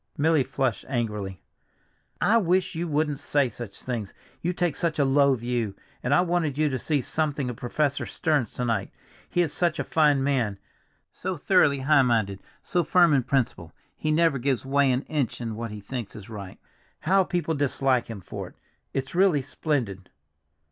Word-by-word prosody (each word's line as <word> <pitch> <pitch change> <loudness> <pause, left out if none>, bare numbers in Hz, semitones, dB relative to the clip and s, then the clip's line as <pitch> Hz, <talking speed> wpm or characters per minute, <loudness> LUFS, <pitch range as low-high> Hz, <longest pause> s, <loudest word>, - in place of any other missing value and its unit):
Milly 155 -1 +3
flushed 130 -3 -1
angrily. 105 - -3 0.8
"I 230 - +4
wish 185 -3 +2
you 170 +1 -2
wouldn't 150 -2 0
say 145 -3 +1
such 115 -2 -9
things—you 125 - -5
take 175 -4 0
such 165 0 -1
a 145 - +3
low 140 0 +4
view! 120 -4 -2 0.3
And 125 - -2
I 145 - +5
wanted 170 -5 0
you 155 0 +2
to 130 -2 -2
see 145 0 0
something 145 -4 -1
of - - -8
Professor 140 +5 -1
Stearns 145 -9 0
to 125 - -2
night, 110 -5 0 0.4
he 175 - +2
is 155 - -3
such 170 -3 +1
a - - -1
fine 150 -4 +3
man, 125 -8 0 0.5
so - - -4
thoroughly 140 -1 +3
high 145 +1 +5
minded, 110 -6 +1 0.2
so 175 -1 +1
firm 175 0 +5
in 135 - +4
principle, 115 - -1 0.2
he 155 - -3
never 155 -2 +3
gives 130 0 0
way 140 0 +3
an 125 +2 0
inch 145 -6 -2
in 115 -3 -4
what 115 +1 -4
he 105 0 -7
thinks 115 +1 -6
is 105 0 -10
right. 100 -3 -8 0.4
How 190 +4 +4
people 175 -3 -1
dislike 135 -3 +1
him 110 -4 -7
for - - -6
it! - - -16 0.4
It's 135 0 -2
really 175 -6 +3
splendid." 120 - -2
135 Hz, 180 wpm, -26 LUFS, 120-155 Hz, 0.8 s, I